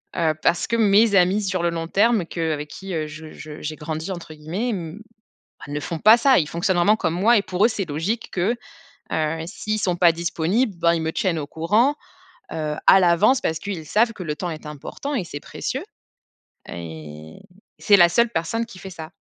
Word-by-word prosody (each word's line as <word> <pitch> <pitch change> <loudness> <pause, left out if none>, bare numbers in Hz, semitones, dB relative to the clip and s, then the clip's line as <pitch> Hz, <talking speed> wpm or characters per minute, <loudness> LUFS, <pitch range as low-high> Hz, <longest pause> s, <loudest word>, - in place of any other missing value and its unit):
heu, 165 -3 +2
parce 175 - +2
que 235 - 0
mes 210 0 +4
amis 190 +3 +4
sur 185 -3 -1
le 170 - +2
long 165 -1 -4
terme 210 0 +2
que 165 -1 -2
avec 150 0 -5
qui 190 +3 -8
je 155 +1 -10
je 155 -1 -10
j'ai 155 +1 -4
«grandi» 160 +4 -5
entre 170 -3 -7
guillemets, 170 +11 -3
m 180 -3 -5 0.7
ne 145 +1 -3
font 165 +1 -4
pas 220 +2 +7
ça. 260 +2 +5
Ils 155 - -1
fonctionnent 175 +2 0
vraiment 200 +5 +4
comme 160 - -1
moi 215 +7 +4
et - - +3
pour 185 +1 -1
eux, - - +7
c'est 205 -5 -3
logique 170 +11 -3
que, 195 +6 0 0.6
heu, 160 +1 0
s'ils 215 +3 -3
ne - - -2
sont 180 -4 0
pas 170 -1 +6
disponibles, 170 +6 -1
bah, 170 0 +3
ils 165 - -2
me 160 0 -1
tiennent 175 -3 0
au 145 - -5
courant, 215 - +2 0.6
heu, 155 -1 -3
à 190 - +8
l'avance, 190 +9 +4
parce 160 -8 -1
qu'ils 175 -4 -6
savent 230 +7 +2
que 190 - -8
le 150 - -2
temps 180 - -4
est 155 -1 -8
important 150 - -6
et 215 -9 -1
c'est 145 -3 -7
précieux. - - -5 0.9
Et 80 -2 -9 0.4
c'est 205 - +5
la 175 -2 +7
seule 235 +7 +3
personne 225 +5 -2
qui 205 - -13
fait 190 - -8
ça. 160 -2 -9
175 Hz, 210 wpm, -22 LUFS, 160-210 Hz, 0.9 s, à